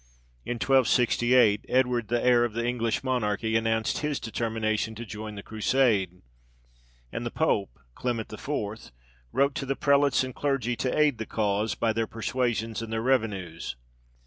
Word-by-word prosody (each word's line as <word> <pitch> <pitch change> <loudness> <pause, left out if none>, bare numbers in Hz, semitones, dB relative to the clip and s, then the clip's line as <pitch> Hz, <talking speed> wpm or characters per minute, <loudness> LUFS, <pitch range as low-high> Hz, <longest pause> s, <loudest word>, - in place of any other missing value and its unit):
In - - -1
1268, 120 -3 +3
Edward, 125 -3 +2
the 120 0 +1
heir 120 -1 +5
of 120 -3 -1
the 115 +1 -2
English 120 -1 -1
monarchy, 110 -4 0
announced 110 0 +1
his 150 -2 -1
determination 110 -1 -2
to 120 +2 -7
join 105 0 -7
the 100 - -8
Crusade; 110 -5 +1 0.9
and 115 - -4
the 120 - -2
pope 105 - 0 0.2
(Clement 115 - -3
IV.) 110 - -4 0.4
wrote 140 +1 +2
to 135 - -4
the 135 - 0
prelates 140 -1 +3
and 130 -1 -5
clergy 135 -4 -1
to 130 +3 -1
aid 150 -6 +3
the 110 - -4
cause 105 0 0
by 115 -1 +1
their 115 0 -1
persuasions 115 -1 -2
and 115 -1 -6
their 110 0 -1
revenues. 100 - -1
115 Hz, 155 wpm, -27 LUFS, 110-125 Hz, 0.9 s, heir